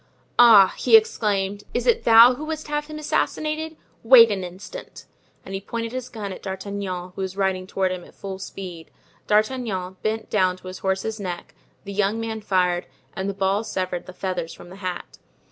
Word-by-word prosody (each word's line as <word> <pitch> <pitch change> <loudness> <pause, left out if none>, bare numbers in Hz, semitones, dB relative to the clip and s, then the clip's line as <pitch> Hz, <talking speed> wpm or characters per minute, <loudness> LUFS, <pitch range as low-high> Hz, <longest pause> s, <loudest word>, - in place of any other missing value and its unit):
"Ah!" 215 -6 +8
he 450 - +7
exclaimed, 205 - -1
"it 245 - 0
is 240 - +3
thou 230 +2 +8
who 285 - -7
wouldst 310 -1 -5
have 295 0 -2
him 305 0 -7
assassinated? 310 +1 -2 0.2
Wait 230 -1 +8
an 195 -2 -2
instant." 185 +2 -9 0.4
And 195 - -8
he 195 - -3
pointed 230 +2 -4
his 255 0 -5
gun 205 -4 -6
at - - -10
D'Artagnan, 190 -2 -5
who - - -5
was 190 0 -4
riding 190 -1 0
toward 190 -1 0
him 180 -1 -5
at - - -17
full 190 -1 -7
speed. 180 -4 -8 0.4
D'Artagnan 210 -4 0
bent 220 0 -2
down 185 -3 +2
to 185 - -13
his 185 - -8
horse's 195 +3 -2
neck, 180 -3 -6 0.3
the 200 - -7
young 205 +2 +1
man 225 -1 -4
fired, 180 -3 +1 0.3
and 190 +1 -2
the 200 - -4
ball 195 +2 +1
severed 185 -4 -3
the - - -7
feathers 180 -3 -4
from 175 - -13
the 185 - -11
hat. 185 -2 -6
200 Hz, 190 wpm, -23 LUFS, 185-230 Hz, 0.4 s, Ah